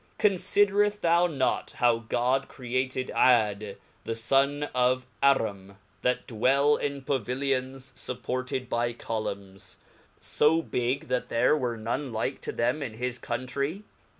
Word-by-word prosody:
Confidereft 205 +1 +2
thou 170 +1 +4
not 135 -6 -1
how 120 -2 +3
God 125 +4 0
entreated 130 +1 -3
Jad 105 -5 +2 0.3
the 115 - -3
Sun 135 +5 +2
of 125 +1 +2 0.2
Arem^ 100 -8 +1 0.3
that 125 0 0
dwelt 135 +5 +2
in 140 -1 -3
paviilions 130 0 -2
fupported 130 +1 -3
by 120 0 0
columns, 100 -4 -6 0.4
fo 160 +2 +2
big, 125 +1 -1
that 125 -1 -1
there 120 +5 +3
were 125 -5 -2
none 120 +5 -3
like 115 +4 -2
to - - -4
them 125 +6 0
in 125 -6 -4
his 125 +1 -3
Countrey 140 +9 -3
130 Hz, 125 wpm, -27 LUFS, 120-140 Hz, 0.4 s, thou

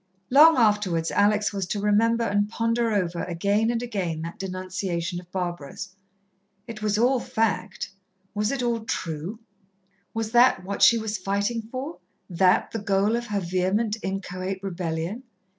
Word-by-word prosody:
Long 310 +4 +8
afterwards 205 -8 +2
Alex 205 +1 +2
was 195 -2 -2
to 205 - -2
remember 225 +3 +2
and 205 -1 +1
ponder 230 +1 0
over 180 -4 -1
again 200 +6 +1
and 235 0 -1
again 180 -9 -3
that 170 +1 -7
denunciation 185 -2 -3
of 180 0 -15
Barbara's. 175 -1 -4 0.8
It 230 -3 -8
was 210 -1 +1
all 250 +3 +3
fact 210 -5 -2 0.4
was 210 +1 0
it 275 -3 -2
all 235 -1 +1
true? 170 -2 -4 0.8
Was 225 -1 -2
that 240 -5 +5
what 200 +1 -4
she 235 - +7
was 220 -2 -3
fighting 200 +5 -1
for 255 +8 -6 0.3
that 185 +1 +3
the 225 - -3
goal 205 +2 +1
of 240 0 -3
her 205 -1 -1
vehement, 190 +5 0
inchoate 190 0 -4
rebellion? 175 +3 -3
205 Hz, 150 wpm, -25 LUFS, 185-225 Hz, 0.8 s, Long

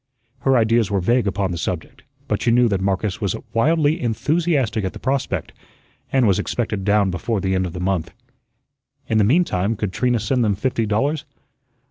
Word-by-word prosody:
Her 135 +1 +3
ideas 115 -2 +2
were 100 -1 +1
vague 120 +5 +1
upon 100 -1 -1
the 85 - -4
subject, 90 -2 -4 0.3
but - - -1
she - - +1
knew 120 +1 +4
that 100 -2 0
Marcus 95 +2 -1
was 100 -3 0 0.2
wildly 155 +6 +2
enthusiastic 135 -2 0
at 95 - -3
the - - -9
prospect, 135 0 -2 0.6
and 130 -2 +3
was 100 -4 +3
expected 110 -5 -2
down 100 -1 +2
before 110 +5 -2
the 95 0 -1
end 95 0 0
of 85 - -8
the 90 - -6
month. 90 -2 -1 1.0
In 110 - +2
the - - +4
meantime, 115 - +2
could 100 -2 -3
Trina 125 +2 +1
send 120 +3 0
them 105 -3 +1
fifty 115 +1 -1
dollars? 140 +9 0
110 Hz, 185 wpm, -21 LUFS, 95-125 Hz, 1.0 s, knew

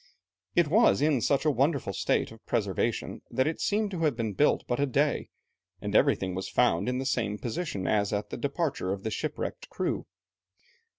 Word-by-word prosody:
It 175 -2 +4
was 215 - +4
in 145 -3 +2
such 140 +5 +1
a 155 - +5
wonderful 140 -6 +1
state - - 0
of - - -14
preservation - - -1
that 130 - +1
it 155 +1 -2
seemed 210 0 +1
to 180 - -4
have 155 -6 +2
been 110 -3 -2
built 150 +10 +3
but 120 - -1
a 140 - +2
day, 140 +3 +1 0.5
and - - -4
everything 95 -1 +3
was 95 +1 -4
found 85 +7 +2
in 125 - -1
the 135 - -2
same 110 -6 0
position 120 - -3
as 100 -2 +1
at 105 0 -2
the - - -4
departure 140 - -1
of 100 0 -6
the 110 - -2
shipwrecked 155 +8 -4
crew. - - -2
130 Hz, 190 wpm, -28 LUFS, 105-155 Hz, 0.5 s, a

